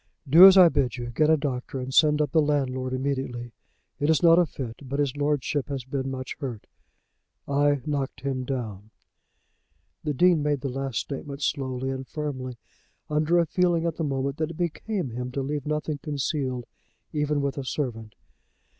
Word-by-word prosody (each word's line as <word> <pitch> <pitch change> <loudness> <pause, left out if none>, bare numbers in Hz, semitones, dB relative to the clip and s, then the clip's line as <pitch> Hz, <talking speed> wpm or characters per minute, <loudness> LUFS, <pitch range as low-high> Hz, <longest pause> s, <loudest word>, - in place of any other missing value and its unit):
"Do 165 +8 +10
as 195 0 +7
I 180 -2 +9
bid 135 -6 0
you; 120 0 -5
get 155 +5 +2
a 160 - +5
doctor 135 -2 -3
and 130 +1 -5
send 150 +1 +5
up 145 - -3
the 160 - +4
landlord 130 -3 0
immediately. 130 -2 -3 0.5
It 145 - +1
is 160 +2 +3
not 170 0 +7
a 175 - +3
fit, 125 -6 -6
but 140 0 -4
his 140 -2 0
lordship 145 -1 -1
has 135 -3 -3
been 135 +1 -3
much 130 -1 -5
hurt. 125 -8 -5 0.8
I 145 -1 +2
knocked 140 -4 -3
him 135 -1 -2
down." 110 -6 -5 1.1
The 150 -2 -2
Dean 175 +1 +4
made 145 -2 0
the 135 - -2
last 135 -1 -3
statement 140 0 -6
slowly 130 -2 -1
and 130 0 -5
firmly, 130 -4 -5 0.5
under 155 +3 +2
a 170 - +4
feeling 175 -1 +1
at 165 -1 -2
the 165 - -2
moment 135 -1 -2
that 155 0 -1
it 165 - -8
became 175 - -2
him 125 +2 -5
to 135 - -2
leave 145 +1 -3
nothing 150 -1 -2
concealed, 140 -4 -2 0.5
even 150 -1 0
with 140 0 -2
a - - -4
servant. 115 -6 -4
140 Hz, 180 wpm, -26 LUFS, 130-150 Hz, 1.1 s, Do